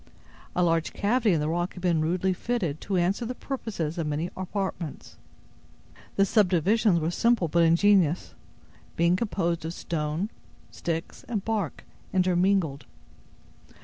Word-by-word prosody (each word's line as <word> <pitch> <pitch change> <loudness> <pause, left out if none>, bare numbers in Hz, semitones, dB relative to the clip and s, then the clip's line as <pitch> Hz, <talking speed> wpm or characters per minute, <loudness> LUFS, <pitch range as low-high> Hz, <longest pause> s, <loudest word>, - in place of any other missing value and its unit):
A 180 - +3
large 165 -1 +1
cavity 220 +1 +2
in 160 - +2
the 150 - -1
rock 175 +2 -1
had 180 - -9
been 170 -3 +2
rudely 180 +4 +1
fitted 180 -7 -2
to 195 -2 -1
answer 185 +6 +1
the 245 +2 -4
purposes 195 - -4
of 160 - -1
many 150 +4 -2
apartments. 185 -4 -4 1.0
The 195 - +4
subdivisions 200 -1 +3
were 160 +1 -1
simple 230 -2 +2
but 170 +2 +2
ingenious, 170 0 +3 0.6
being 170 +1 +3
composed 185 -5 -1
of 165 +2 -4
stone, 160 +5 -2 0.4
sticks, 165 -1 -4
and 215 -5 -3
bark, 210 -8 -2 0.3
intermingled. 180 -5 +2
180 Hz, 135 wpm, -27 LUFS, 165-200 Hz, 1.0 s, The